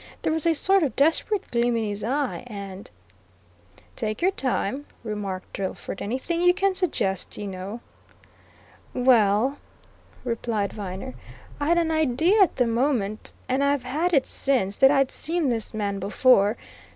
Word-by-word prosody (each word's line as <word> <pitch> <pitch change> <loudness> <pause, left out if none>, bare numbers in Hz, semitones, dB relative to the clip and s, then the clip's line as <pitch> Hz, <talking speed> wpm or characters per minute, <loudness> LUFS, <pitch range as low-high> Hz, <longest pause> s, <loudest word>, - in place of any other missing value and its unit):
There 315 - +1
was 320 0 +2
a 330 - +3
sort 385 +5 +3
of 295 -5 -1
desperate 330 +8 +1
gleam 235 0 +1
in 225 - -1
his 205 -1 -4
eye. 270 +3 -1
And 200 -3 -8 0.5
" 90 +1 -29
"Take 215 0 -3
your 375 - +4
time," 270 - -2 0.2
remarked 205 -4 -5
Drillford. 195 0 -5
"Anything 265 +10 -2
you 355 0 +5
can 390 0 +1
suggest, 245 - -1
you 205 - -5
know 195 +4 -6 0.6
" - - -28
"Well," 245 +1 +3 0.6
replied 230 -4 -2
Viner. 200 +5 -6 0.5
"I'd 320 +4 +2
an 330 -1 +1
idea 315 - +3
at 385 - +4
the 250 - +2
moment, 230 -3 -1
and 265 +2 +1
I've 280 -2 +1
had 305 +8 -1
it 280 -6 +3
since, 245 -8 0
that 270 - +7
I'd 275 -2 +2
seen 330 -3 -1
this 225 -3 -2
man 205 -2 -2
before. 205 +1 +3
245 Hz, 155 wpm, -25 LUFS, 205-295 Hz, 0.6 s, that